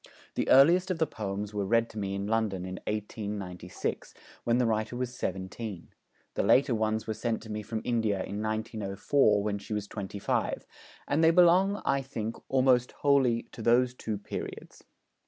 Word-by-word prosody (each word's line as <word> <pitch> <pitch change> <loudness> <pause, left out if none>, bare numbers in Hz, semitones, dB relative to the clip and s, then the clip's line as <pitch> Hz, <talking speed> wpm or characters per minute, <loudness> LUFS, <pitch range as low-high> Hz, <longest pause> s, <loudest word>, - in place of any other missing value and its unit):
The - - -1
earliest 170 +8 +6
of 185 - 0
the 160 - +2
poems 105 -4 -5
were 105 -1 -1
read 115 +3 +2
to 110 - -6
me 100 -1 -2
in 100 0 -3
London 105 -4 0
in 95 0 -6
1896, 100 -4 -4 0.3
when 120 0 +2
the 125 - +3
writer 110 +1 0
was 125 0 -3
seventeen; 95 0 -5 0.4
the - - 0
later 135 -1 +4
ones 110 0 0
were 110 - -2
sent 110 +1 -2
to 110 - -8
me 105 0 -3
from 110 +1 -4
India 110 -4 +1
in 100 +2 -5
1904, 110 +1 +1
when 100 -1 -1
she 105 - -7
was 105 -1 -2
twenty 100 -1 -6
five; 100 - -1 0.4
and 155 +3 +2
they 160 - +7
belong, 180 +4 +4
I 140 0 +2
think, 115 -4 -4
almost 130 -2 +3
wholly 135 -5 +2
to - - -9
those 120 +2 +3
two 110 -4 -4
periods. 100 - -7
110 Hz, 175 wpm, -29 LUFS, 105-125 Hz, 0.4 s, they